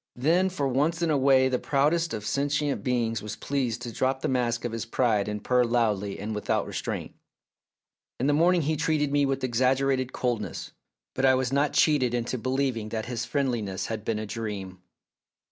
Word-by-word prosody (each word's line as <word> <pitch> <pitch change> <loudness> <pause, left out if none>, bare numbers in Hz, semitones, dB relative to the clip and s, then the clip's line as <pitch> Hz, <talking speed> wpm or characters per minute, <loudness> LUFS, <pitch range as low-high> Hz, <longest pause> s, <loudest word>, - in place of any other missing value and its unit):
Then 170 +9 +2
for 145 -7 -1
once 150 +6 0
in 165 - +2
a 150 - +3
way 130 -1 +5
the 130 -1 0
proudest 155 +4 +1
of 105 -1 -4
sentient 145 +2 0
beings 120 -3 0
was 105 - -6
pleased 125 -5 -2
to 120 - -5
drop 130 +3 -1
the - - 0
mask 120 -2 0
of 120 - -2
his 115 -1 -3
pride 115 -3 +1
and 105 -1 -4
purr 125 -1 +3
loudly 110 -5 0
and 105 +2 -4
without 105 - -1
restraint. - - -4 1.1
In 125 - 0
the 145 - +3
morning 170 +2 +3
he 155 +2 0
treated 155 -2 0
me 145 -1 +3
with 135 0 -2
exagge 130 +2 +2
rated 130 -2 0
coldness, 115 -7 -3 0.4
but 130 - -3
I 130 -1 +6
was 130 0 -1
not 145 +1 +2
cheated 130 -6 +3
into 120 +1 -2
believing 130 -3 -1
that 110 0 -3
his 120 0 -3
friendliness 115 -10 -1
had 110 -2 -4
been 110 -1 -1
a 110 - -4
dream. 100 -4 -5
130 Hz, 195 wpm, -27 LUFS, 115-140 Hz, 1.1 s, I